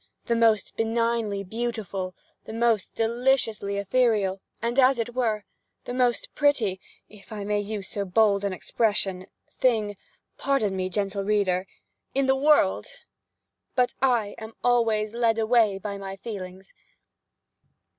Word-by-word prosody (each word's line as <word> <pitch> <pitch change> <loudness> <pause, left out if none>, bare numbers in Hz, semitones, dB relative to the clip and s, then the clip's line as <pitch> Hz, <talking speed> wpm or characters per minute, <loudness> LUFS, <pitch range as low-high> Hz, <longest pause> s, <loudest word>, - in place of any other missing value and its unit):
the 235 - +1
most 225 -3 +2
benignly 225 -2 0
beautiful, 200 -3 -4 0.3
the - - -8
most 230 -3 +1
deliciously 225 -3 +1
ethereal, 200 -2 +1 0.2
and, 235 +3 0
as 260 0 +5
it 235 +1 -3
were, 225 -4 -1 0.4
the 245 - -5
most 250 -1 +1
pretty 240 -10 +2 0.3
(if 210 +1 -16
I 210 -2 -5
may 205 +1 0
use 205 -2 -5
so 200 - -2
bold 200 +1 +3
an 200 - 0
expression) 195 -1 0 0.2
thing 220 -5 0 0.4
(pardon 225 -9 +1
me, 185 0 -2
gentle 200 0 -2
reader!) 195 -2 +1 0.5
in 275 0 +2
the 265 0 +3
world—but 265 -2 -1
I 235 -6 +2
am 220 0 -8
always 225 -3 +2
led 230 -1 +2
away 220 -3 +3
by 200 0 -5
my 195 0 -6
feelings. 190 -3 -8
215 Hz, 130 wpm, -26 LUFS, 200-235 Hz, 0.5 s, as